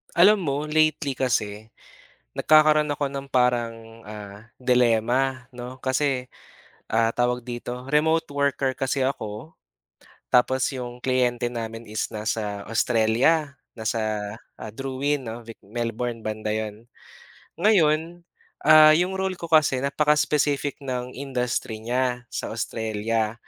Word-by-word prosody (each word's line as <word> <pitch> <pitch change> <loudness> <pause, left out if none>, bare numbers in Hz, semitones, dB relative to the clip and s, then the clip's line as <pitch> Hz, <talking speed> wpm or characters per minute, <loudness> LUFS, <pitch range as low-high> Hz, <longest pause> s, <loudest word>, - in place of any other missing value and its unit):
Alam 200 +5 +7
mo 145 +2 -2
lately 155 -3 +1
kasi, 110 -4 -2 0.6
nagkakaroon 155 -1 +4
ako 145 0 -1
ng 140 0 -6
parang 115 -2 0
ah, 105 +1 -10
dilema 125 +1 +2
'no, 125 +1 -8
kasi, 130 0 0 0.6
ah, 115 0 +2
tawag 125 0 0
dito, 120 0 -6
remote 160 +3 +2
worker 140 -2 0
kasi 135 0 -1
ako, 110 +2 -5 0.8
tapos 130 +1 +3
yung 125 -2 -7
kliyente 125 -2 +1
namin 115 -1 -5
is 110 -1 -3
nasa 105 -1 -3
Australia 125 +7 +2 0.2
nasa 110 +1 -2 0.7
Drouin 135 +2 -2
'no, 115 +1 -6 0.2
Melbourne 115 +2 -4
banda 110 0 -3
'yon. 110 +1 -5 0.7
Ngayon, 170 -3 +2 0.4
ah, 155 0 +8
yung 180 +4 0
role 190 0 -1
ko 170 -2 -8
kasi 150 -5 +4
napaka-spesific 145 -1 +1
ng 125 -1 -3
industry 125 -4 -3
niya, 125 0 -1
sa - - -4
Australia, 110 -1 -2
125 Hz, 110 wpm, -24 LUFS, 115-145 Hz, 0.8 s, ah